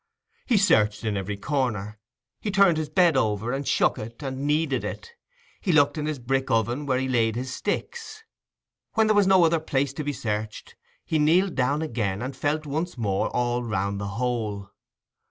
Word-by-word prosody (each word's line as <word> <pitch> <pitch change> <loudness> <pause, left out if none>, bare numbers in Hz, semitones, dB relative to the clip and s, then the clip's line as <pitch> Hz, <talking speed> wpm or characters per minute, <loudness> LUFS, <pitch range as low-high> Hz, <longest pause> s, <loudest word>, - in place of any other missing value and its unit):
He 240 - +3
searched 105 - +3
in 110 -2 -1
every 100 +1 -3
corner, 110 -5 -2 0.4
he 215 - -3
turned 195 -4 +4
his 155 -1 -2
bed 170 0 +4
over, 110 -2 0
and 135 +1 -3
shook - - +2
it, 115 +5 -8
and 135 +1 -3
kneaded 150 -4 +1
it; 465 - -6 0.5
he 190 - 0
looked 145 -3 +4
in 150 -1 -3
his 155 -2 -2
brick 135 +2 -1
oven 120 +6 0
where 130 -2 +2
he 130 +1 -1
laid 115 -3 +1
his 130 +2 -4
sticks. 445 -2 -4 0.7
When 220 0 +4
there 215 -1 +3
was 205 -2 +4
no 190 -2 +6
other 165 0 +2
place 140 -3 -1
to 150 - -4
be 145 - -1
searched, 110 -4 -4 0.3
he 160 - 0
kneeled 175 +5 +3
down 140 +4 0
again 110 -9 -2
and 130 +1 -5
felt 150 +3 -1
once 155 +3 -3
more 100 -4 0
all 120 0 0
round 100 -3 -2
the 100 - -3
hole. 110 -5 -2
135 Hz, 190 wpm, -25 LUFS, 110-155 Hz, 0.7 s, no